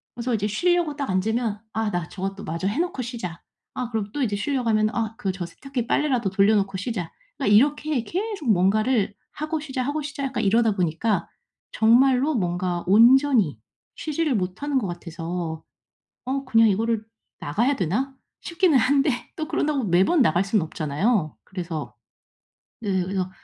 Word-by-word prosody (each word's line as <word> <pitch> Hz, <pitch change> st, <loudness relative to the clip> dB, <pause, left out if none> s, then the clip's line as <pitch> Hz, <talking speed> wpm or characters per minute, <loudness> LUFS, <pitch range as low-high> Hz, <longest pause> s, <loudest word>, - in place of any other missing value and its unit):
그래서 240 Hz, +1 st, -2 dB
이제 210 Hz, -2 st, 0 dB
쉬려고 345 Hz, -, +1 dB
딱 280 Hz, -5 st, -3 dB
앉으면 215 Hz, +3 st, 0 dB
'아 220 Hz, -1 st, -1 dB
나 175 Hz, -2 st, -2 dB
저것도 195 Hz, +1 st, -5 dB
마저 170 Hz, +4 st, -2 dB
해 210 Hz, +9 st, -1 dB
놓고 345 Hz, -6 st, -1 dB
쉬자.' 225 Hz, -9 st, -6 dB, 0.3 s
아 250 Hz, -2 st, -3 dB
그리고 210 Hz, -3 st, -2 dB
또 290 Hz, -, -1 dB
이제 210 Hz, -4 st, 0 dB
쉬려고 245 Hz, +2 st, -1 dB
하면 215 Hz, -1 st, +3 dB
'아 225 Hz, -1 st, -2 dB
그 195 Hz, -, -1 dB
저 180 Hz, -2 st, -5 dB
세탁기 245 Hz, +7 st, -5 dB
빨래라도 250 Hz, -9 st, +1 dB
돌려놓고 195 Hz, 0 st, +2 dB
쉬자.' 185 Hz, -5 st, -4 dB, 0.3 s
그러니까 260 Hz, -8 st, +2 dB
이렇게 290 Hz, +1 st, +2 dB
계속 390 Hz, -, -3 dB
뭔가를 210 Hz, +3 st, +2 dB, 0.2 s
'하고 310 Hz, +1 st, -3 dB
쉬자. 265 Hz, -4 st, -3 dB
하고 290 Hz, +4 st, -2 dB
쉬자.' 280 Hz, -1 st, -5 dB
약간 265 Hz, -4 st, -2 dB
이러다 225 Hz, +3 st, +3 dB
보니까 180 Hz, +2 st, 0 dB, 0.4 s
정말로 255 Hz, +6 st, +4 dB
뭔가 175 Hz, -2 st, -1 dB
온전히 235 Hz, -, +5 dB, 0.4 s
쉬지를 305 Hz, -3 st, -1 dB
못하는 215 Hz, +10 st, -1 dB
것 210 Hz, -, -3 dB
같아서 170 Hz, -1 st, -5 dB, 0.6 s
'어 270 Hz, +1 st, -2 dB
그냥 225 Hz, -3 st, +5 dB
이거를 220 Hz, +2 st, 0 dB, 0.4 s
나가야 235 Hz, -, +1 dB
되나?' 230 Hz, -, -1 dB, 0.3 s
싶기는 340 Hz, -3 st, +2 dB
한데 275 Hz, +4 st, +3 dB, 0.3 s
또 310 Hz, -1 st, -4 dB
그런다고 300 Hz, -5 st, 0 dB
매번 195 Hz, -, +4 dB
나갈 175 Hz, -3 st, +2 dB
순 200 Hz, +2 st, +1 dB
없잖아요. 160 Hz, +4 st, -1 dB
그래서 170 Hz, -4 st, -6 dB, 0.9 s
네 195 Hz, -4 st, 0 dB
그래서 185 Hz, 0 st, -2 dB
225 Hz, 345 characters per minute, -24 LUFS, 190-270 Hz, 0.9 s, 온전히